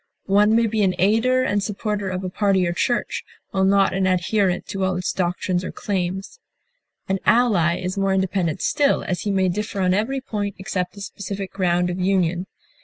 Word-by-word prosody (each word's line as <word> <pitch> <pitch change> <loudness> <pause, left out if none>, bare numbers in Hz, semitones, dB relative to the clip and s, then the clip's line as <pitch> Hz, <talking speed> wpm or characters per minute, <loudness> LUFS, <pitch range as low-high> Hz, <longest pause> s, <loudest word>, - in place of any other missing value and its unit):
One 205 +2 +4
may 230 0 +4
be 220 -1 0
an 190 -2 +2
aider 225 +7 +3
and 205 -5 +1
supporter 205 0 -2
of 185 0 -3
a 185 - -2
party 195 -2 +2
or 170 - -1
church, 240 +7 -1 0.3
while 190 -1 +1
not 195 0 +3
an 190 0 +1
adherent 185 0 +1
to 195 -1 -2
all 185 -1 +1
its 180 0 -2
doctrines 180 0 -1
or - - -4
claims. 190 -1 -3 0.7
An 190 0 0
ally 200 -8 +3
is 185 +2 -3
more 195 0 +1
independent 190 -4 -1
still, 285 -1 +2
as 180 -3 -2
he 205 - -1
may 190 -1 +2
differ 205 +3 -3
on 185 -1 +2
every 225 +8 0
point 205 -6 -4
except 185 -1 -3
the 200 - -10
specific 200 -1 -6
ground 180 -2 +1
of 180 - -4
union. 180 -1 +1
195 Hz, 190 wpm, -22 LUFS, 185-205 Hz, 0.7 s, One